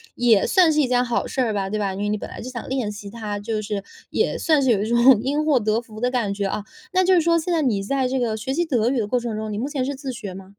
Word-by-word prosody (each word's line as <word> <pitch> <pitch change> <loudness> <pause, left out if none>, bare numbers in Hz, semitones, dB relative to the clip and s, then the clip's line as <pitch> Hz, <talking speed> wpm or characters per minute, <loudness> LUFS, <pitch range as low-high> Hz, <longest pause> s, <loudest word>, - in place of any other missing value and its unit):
也 230 -4 +4
算 360 -4 +5
是 305 - +1
一 265 - +1
件 250 0 +2
好 240 -1 -1
事 265 - -2
儿 225 -4 0
吧， 195 -1 -2
对 215 +1 -2
吧？ 195 -2 -1
因 195 - -6
为 205 - -1
你 210 - 0
本 - - -7
来 - - -9
就 255 - -6
想 240 -2 -7
练 255 -5 -1
习 205 -1 -8
它， 210 -2 -5
就 215 +1 -3
是 205 -2 -4 0.3
也 - - 0
算 310 -3 +2
是 265 - +2
有 200 -2 +2
一 215 - -3
种 235 0 +6
因 290 +4 0
祸 290 -5 +4
得 215 +2 0
福 215 -2 -12
的 250 +1 +1
感 230 -6 0
觉 200 0 -2
啊。 205 - -3 0.3
那 370 0 +4
就 375 - +4
是 350 - +5
说 335 +1 +3
现 335 +3 -3
在 325 - +2
你 225 -9 +1
在 265 +5 0
这 260 +1 -1
个 230 -3 0
学 260 +5 -3
习 345 - +1
德 240 -7 +1
语 255 -2 0
的 210 - -1
过 250 +4 +1
程 235 -2 -4
中， 215 0 -4
你 205 - -3
目 240 +6 -2
前 285 -3 -2
是 280 - -2
自 270 0 -5
学 225 -7 -7
吗？ 190 +1 -11
235 Hz, 350 characters per minute, -22 LUFS, 210-265 Hz, 0.3 s, 种